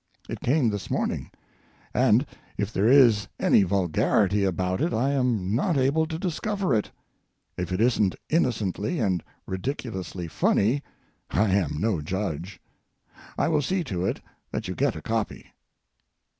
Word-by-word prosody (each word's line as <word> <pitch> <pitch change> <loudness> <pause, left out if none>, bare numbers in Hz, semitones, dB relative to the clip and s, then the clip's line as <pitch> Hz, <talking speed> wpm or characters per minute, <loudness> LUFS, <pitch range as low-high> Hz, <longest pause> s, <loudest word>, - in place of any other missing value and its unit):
It - - -5
came 130 -3 +2
this 100 -1 -5
morning, - - -1 0.6
and - - +4 0.3
if 105 +2 -2
there 100 +3 +2
is 120 -6 +6
any - - +5
vulgarity 100 +2 +2
about 95 +2 0
it 165 - +1
I 130 +5 +1
am 120 -8 0
not 150 - +1
able 140 +5 +2
to 160 0 -4
discover 190 0 -1
it. 105 -2 +1 0.7
If 90 0 -4
it 90 - -1
isn't 110 -5 +2
innocently 125 - 0
and 95 - 0 0.2
ridiculously 95 - -4
funny, 115 - +2 0.5
I 105 0 +2
am 80 -7 +1
no 105 -5 0
judge. 95 +1 -4 0.8
I - - +2
will 155 -2 +2
see 180 +6 0
to 90 - -3
it - - -2 0.3
that 110 -2 -4
you 90 - -3
get 140 +5 0
a - - -8
copy. 110 -2 -3
110 Hz, 145 wpm, -26 LUFS, 95-135 Hz, 0.8 s, is